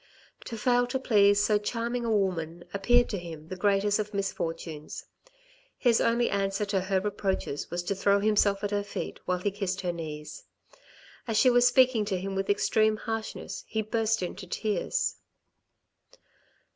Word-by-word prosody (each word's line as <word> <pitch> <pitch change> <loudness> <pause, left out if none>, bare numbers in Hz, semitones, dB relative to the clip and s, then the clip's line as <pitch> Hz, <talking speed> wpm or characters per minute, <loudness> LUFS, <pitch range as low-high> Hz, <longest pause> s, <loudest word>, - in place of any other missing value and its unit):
To 230 - -6
fail 245 +2 +2
to 245 - -1
please 205 -5 +4
so 210 0 +3
charming 235 +3 -2
a 230 - 0
woman 175 -5 -1
appeared 240 +5 +3
to 200 - -3
him 165 -2 -9
the 185 - -4
greatest 200 +2 +2
of 210 0 -4
misfortunes. 165 -5 -4 0.7
His 240 -3 +3
only 235 +1 +2
answer 195 +1 0
to 200 -2 0
her 190 0 +1
reproaches 195 -7 -2
was 175 +1 -3
to 175 - -1
throw 200 +1 +2
himself 205 -1 +2
at 205 - -1
her 205 0 +1
feet 205 - -6
while 180 - 0
he 200 +3 -1
kissed 195 -1 -3
her 180 -2 -2
knees. 155 -3 -7 0.8
As 225 -2 0
she 255 - +6
was 245 0 +5
speaking 255 -4 +4
to 195 -2 -1
him 195 +1 -4
with 195 0 -2
extreme 215 +1 +2
harshness, 225 0 -5
he 220 0 -2
burst 220 -1 0
into 185 +1 -6
tears. 220 - -1
205 Hz, 165 wpm, -28 LUFS, 190-225 Hz, 0.8 s, she